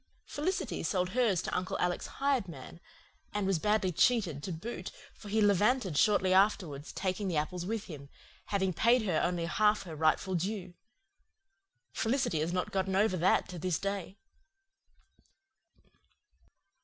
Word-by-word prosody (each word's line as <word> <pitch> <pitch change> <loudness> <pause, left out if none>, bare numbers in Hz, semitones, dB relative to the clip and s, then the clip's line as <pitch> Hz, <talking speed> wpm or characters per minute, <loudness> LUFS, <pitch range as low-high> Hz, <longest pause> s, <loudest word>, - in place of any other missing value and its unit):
Felicity 365 +6 -2
sold 180 -2 0
hers 215 -5 +1
to - - -3
Uncle 180 0 -2
Alec's 180 0 -1
hired 270 -7 0
man 160 0 -10 0.6
and 205 -1 0
was 190 -3 +1
badly 210 0 +1
cheated 180 - +2
to 185 - -5
boot, 195 +9 -6 0.2
for 210 - -12
he 220 +2 +1
levanted 205 - +2
shortly 190 +2 +3
afterwards, 185 -7 +1
taking 190 +1 -2
the 175 -4 -1
apples 175 +4 -2
with 220 0 -2
him, 140 -4 -10 0.4
having 190 -2 0
paid 235 +6 +3
her 180 -7 +1
only 175 -1 0
half 210 +3 +2
her 165 -4 -8
rightful 160 +5 +1
due. 185 +1 -3 1.2
Felicity 225 - 0
has 160 +3 -1
not 180 0 -2
gotten 190 0 -1
over 200 -1 +3
that 180 +2 +2
to 180 -1 -7
this 180 -1 0
day. 195 -1 -4
190 Hz, 145 wpm, -31 LUFS, 175-210 Hz, 1.2 s, shortly